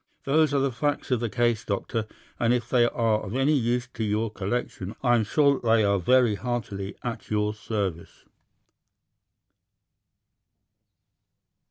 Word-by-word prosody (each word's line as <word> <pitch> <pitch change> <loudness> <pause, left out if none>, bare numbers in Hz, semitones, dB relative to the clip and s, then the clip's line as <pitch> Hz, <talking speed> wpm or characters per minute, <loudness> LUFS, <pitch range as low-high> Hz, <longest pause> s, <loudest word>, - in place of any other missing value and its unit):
Those 155 +1 +3
are 140 - +1
the 135 0 +1
facts 145 +3 -2
of 125 - +2
the 120 -1 -2
case, 120 +1 +1
Doctor, 110 +2 -2 0.3
and 120 +1 +3
if 120 -1 -3
they 120 -1 +3
are 115 -2 +1
of 95 - -6
any 135 +3 +2
use 125 -2 0
to 115 - -3
your 110 +1 -1
collection, 100 -1 -4
I 120 -2 +4
am 115 -2 +3
sure 140 +6 +3
that 120 - -6
they 115 -1 +4
are 100 -1 +2
very 120 +4 +4
heartily 100 -4 -4
at 120 -2 -5
your 105 0 0
service." 100 -5 -4
115 Hz, 150 wpm, -26 LUFS, 105-125 Hz, 0.3 s, I